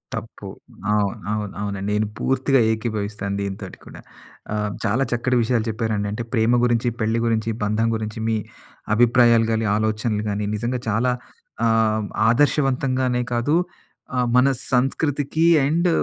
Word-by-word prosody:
తప్పు. - - -8 0.5
అవును. 105 -2 0 0.2
అవును. 105 -2 -3
అవునండి. 100 -1 -3
నేను 105 +1 +1
పూర్తిగా 135 0 +2
ఏకీభవిస్తాను 105 -3 -3
దీనితోటి 100 -1 -6
కూడా. - - -11 0.5
ఆహ్, 105 -1 -1
చాలా 120 +7 +2
చక్కటి 125 +1 +1
విషయాలు 115 -1 +1
చెప్పారండి. 110 -2 -1
అంటే, 110 +3 -3
ప్రేమ 120 +1 +3
గురించి, 120 0 +2
పెళ్లి 110 +2 +1
గురించి, 115 -1 0
బంధం 110 +2 +1
గురించి, 110 0 -5
మీ 110 - +1 0.6
అభిప్రాయాలు 120 -1 +5
గానీ, 110 0 0
ఆలోచనలు 110 0 -1
గానీ, 100 0 -2
నిజంగా 120 +3 -2
చాలా 125 +4 +1 0.5
ఆహ్, 110 -1 +2 0.2
ఆదర్శవంతంగానే 130 -1 +1
కాదు 120 +6 +1 0.6
ఆహ్, 125 - +2
మన 125 +2 +5 0.3
సంస్కృతికి 145 +4 +1 0.2
అండ్ 170 +5 +2
115 Hz, 130 wpm, -22 LUFS, 105-125 Hz, 0.6 s, అభిప్రాయాలు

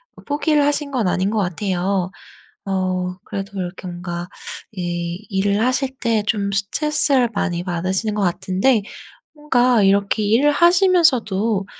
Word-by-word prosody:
뭐 - - -15
포기를 295 +1 +1
하신 290 0 0
건 245 -7 0
아닌 185 +2 0
것 220 - 0
같아요. 185 0 -1 0.5
어 185 -2 -1
그래도 200 0 -6
이렇게 180 +1 -6
뭔가 175 0 -5 0.5
이 175 +1 -4
일을 200 +1 +1
하실 265 +1 0
때 230 -2 +1
좀 200 -3 0
스트레스를 255 +5 +2
많이 175 -4 -2
받으시는 185 +4 -2
것 210 - -2
같은데 190 +6 +1 0.5
뭔가 250 -7 +2
'이렇게 200 +2 +2
일을 235 +8 +3
하시면서도 285 - +3
200 Hz, 285 characters per minute, -20 LUFS, 185-255 Hz, 0.5 s, 일을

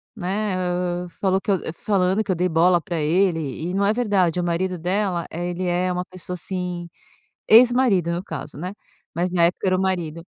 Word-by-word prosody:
né, 200 0 -2
hã, 180 0 -2
falou 190 +2 0
que 200 - -2
eu 190 - +2 0.2
falando 195 +1 +1
que 195 - -2
eu - - +1
dei 180 +2 0
bola 170 +1 +4
para 170 0 -4
ele 170 +3 +2 0.3
e - - -2
não 200 0 +2
é 210 - +3
verdade, 195 -8 +1
o - - 0
marido 175 +1 -1
dela, 180 0 -1
eh, 175 +2 -3
ele 180 +1 -3
é 180 +1 +1
uma 180 0 -2
pessoa, 185 -1 -8
assim, 180 -1 -4 0.6
ex-marido 230 -7 +5
no 175 +1 -2
caso, 150 -6 -7
né, 180 +5 -5 0.4
mas 175 +1 0
na 170 -2 +4
época 180 +2 -1
era 185 0 +3
o - - 0
marido. 170 -4 -2
180 Hz, 205 wpm, -22 LUFS, 175-190 Hz, 0.6 s, ex-marido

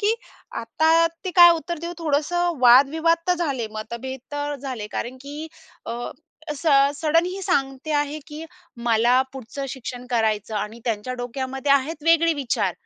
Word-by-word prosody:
की 425 +2 +2 0.5
आता 320 +7 +3 0.2
ते 370 - -2
काय 345 0 +10
उत्तर 335 +1 -5
देऊ 340 +2 -5
थोडंसं 330 +1 0
वादविवाद 285 +7 +5
तर 360 - +4
झाले, 280 -9 -2
मतभेद 235 +4 -6
तर 290 0 -2
झाले 255 -6 -5
कारण 255 +2 -4
की 295 +3 -7 0.4
अ, 230 - -3 0.6
"स 330 - -8 0.3
सडन 330 +2 +2
ही 380 +2 -5
सांगते 275 -4 -1
आहे 290 +1 -1
की 305 +1 -8 0.4
मला 235 +3 +4
पुढचं 270 +2 -6
शिक्षण 250 -1 -7
करायचं" 220 -2 0
आणि 215 +3 -4
त्यांच्या 230 +1 -2
डोक्यामध्ये 265 +3 -1
आहेत 290 +3 0
वेगळे 330 0 +4
विचार, 260 -4 0
280 Hz, 150 wpm, -23 LUFS, 245-325 Hz, 0.6 s, काय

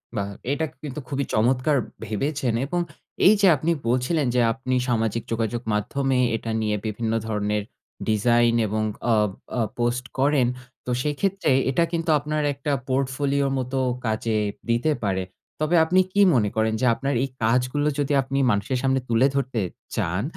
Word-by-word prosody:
বাহ! 100 -1 -2 0.2
এটা 155 +3 0 0.2
কিন্তু 145 -1 -5
খুবই 140 0 -1
চমৎকার 130 +6 +2 0.3
ভেবেছেন। 130 +4 -1
এবং 175 +5 -1 0.5
এই 205 - +8
যে 200 - +6
আপনি 155 +4 0 0.2
বলছিলেন 130 +5 +1
যে, 125 - +4
আপনি 130 0 -2
সামাজিক 115 -1 0
যোগাযোগ 115 +1 -1
মাধ্যমে 135 +6 0 0.2
এটা 115 0 -4
নিয়ে 105 -1 0
বিভিন্ন 110 +1 -2
ধরনের 105 -1 -1 0.5
ডিজাইন 120 +2 +3
এবং 110 +1 -1 0.3
আ - - +4 0.4
আ - - +2 0.2
পোস্ট 120 +1 0
করেন। 140 -2 +3 0.4
তো 125 - -2
সেক্ষেত্রে 160 +3 0 0.2
এটা 135 +6 +2
কিন্তু 165 -1 -2
আপনার 150 +1 -2
একটা 140 +2 -3 0.2
পোর্টফোলিও 140 +1 0
মত 130 0 -4 0.3
কাজে 110 0 0 0.3
দিতে 120 +7 +2
পারে। 95 -2 0 0.4
তবে 155 +3 +1
আপনি 180 +3 +3
কি 205 - +4
মনে 105 -4 +2
করেন? 110 0 +1
যে - - +2
আপনার 140 +3 -2
এই - - 0 0.2
কাজগুলো 125 +6 +1
যদি 145 0 0
আপনি 135 +1 -3
মানুষের 105 +6 0
সামনে 135 0 +2
তুলে 115 +3 +4
ধরতে 130 -4 -1 0.3
চান, 90 +5 -1
125 Hz, 155 wpm, -24 LUFS, 110-140 Hz, 0.5 s, এই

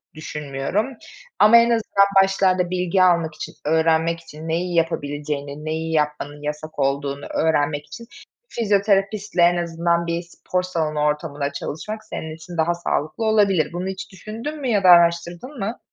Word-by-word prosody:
düşünmüyorum. 150 - -3 0.5
Ama 215 +3 +8
en 235 0 +5
azından 220 -4 +3 0.2
başlarda 185 -2 +1
bilgi 180 +1 +1
almak 170 -3 +2
için, - - -7
öğrenmek 160 +1 +2
için 160 -1 -11
neyi 175 +2 -1
yapabileceğini, 145 -2 -2
neyi 160 +1 -3
yapmanın 150 -1 -1
yasak 150 +1 -5
olduğunu 140 +1 -1
öğrenmek 145 -2 0
için 235 -1 -10 0.4
fizyoterapistle, 200 -2 +1
en 175 +1 +5
azından 170 0 0
bir 170 0 -1
spor 180 +1 -3
salonu 160 -4 -2
ortamında 150 -1 -1
çalışmak 215 +8 -5
senin 160 -6 -6
için 170 +1 -10
daha 165 +2 +2
sağlıklı 170 +3 -2
olabilir. 200 -7 +2
Bunu 180 +2 -3
hiç 190 +1 -6
düşündün 230 - -7
mü 265 - -2
ya 205 -4 +2
da 185 - +6
araştırdın 170 - +3
mı? 215 +4 -3
170 Hz, 145 wpm, -22 LUFS, 155-195 Hz, 0.5 s, Ama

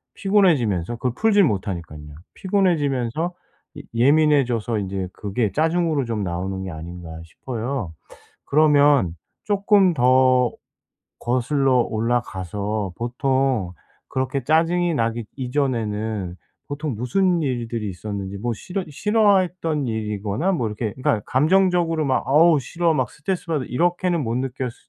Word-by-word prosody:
피곤해지면서 140 - +2
그걸 125 +2 -2
풀지를 205 -4 +4
못하니깐요. 85 - -5 0.2
피곤해지면서 165 - 0 0.4
예 - - -6
예민해져서 125 -4 +2
이제 95 -2 -4
그게 105 +2 -2
짜증으로 160 -2 +1
좀 115 -3 -2
나오는 95 +2 -3
게 95 - -5
아닌가 85 +1 -8 0.2
싶어요. 115 0 -5 0.5
그러면 145 - +4 0.3
쪼끔 200 -2 +3
더 130 -2 +4 0.7
거슬러 130 +2 +1
올라가서 105 -3 -2
보통 125 -4 0 0.4
그렇게 130 0 -2
짜증이 170 +4 +2
나기 115 -2 -1
이전에는 110 -8 -2 0.3
보통 145 -2 -4
무슨 175 - +1
일들이 120 -6 -2
있었는지 100 +1 -6
뭐 120 +3 -2
싫어 185 - -5
싫어했던 185 - +1
일이거나 110 - -2
뭐 125 -10 -1
이렇게 105 0 -4
그러니까 130 -4 0
감정적으로 165 +2 +2
막 130 - +1
'어우 155 +2 +5
싫어. 170 +5 0
막 - - 0
스트레스 180 +5 -4
받아.' 150 -6 -1
이렇게는 175 +4 0
못 115 -1 -2
느꼈으 130 0 -3
스 - - -22
130 Hz, 315 characters per minute, -22 LUFS, 110-160 Hz, 0.7 s, 어우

